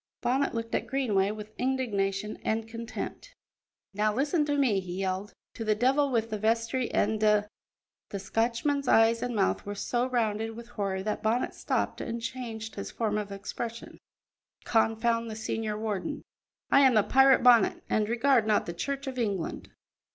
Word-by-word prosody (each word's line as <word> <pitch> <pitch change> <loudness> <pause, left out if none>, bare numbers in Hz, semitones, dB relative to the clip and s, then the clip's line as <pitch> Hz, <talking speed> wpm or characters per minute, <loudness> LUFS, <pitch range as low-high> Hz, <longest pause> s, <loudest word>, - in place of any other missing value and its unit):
Bonnet 255 +2 +1
looked 230 0 -4
at - - -1
Greenway 210 -8 +1
with 215 0 -7
indignation 210 -6 -1
and 220 0 -1
contempt. 235 - -7 0.6
"Now 210 +2 +1
listen 295 - +1
to 290 -1 0
me," 245 -8 +3
he 180 -2 -6
yelled. 190 +2 -3 0.2
"To 225 - -5
the 215 -1 +2
devil 270 +5 +2
with 230 -3 0
the 215 - -2
vestry 230 +3 0
and 215 +1 +1
da 210 -1 +4 0.3
" - - -66
the 200 - -4
Scotchman's 235 +8 0
eyes 225 0 +4
and 245 -1 -2
mouth 195 -2 +1
were 205 0 -5
so 240 +4 -1
rounded 225 -3 -1
with 235 +1 -10
horror 195 -5 -2
that 210 +1 -2
Bonnet 225 +3 0
stopped - - -2
and 230 0 -4
changed 230 -2 -5
his 200 - -6
form 215 -2 -1
of 205 -1 -5
expression 225 +4 -6 0.6
"confound 230 +1 +1
the 215 - -5
senior 220 -1 -3
warden. 215 +6 -3 0.5
I - - +7
am 265 -3 +5
the 215 - +5
pirate 265 +1 +5
Bonnet, 240 -4 +5
and 215 -1 +1
regard 240 -1 +3
not 210 -1 +2
the 170 - -5
Church 275 +10 -3
of 260 -2 -4
England." 200 -7 -2
225 Hz, 175 wpm, -28 LUFS, 210-245 Hz, 0.6 s, I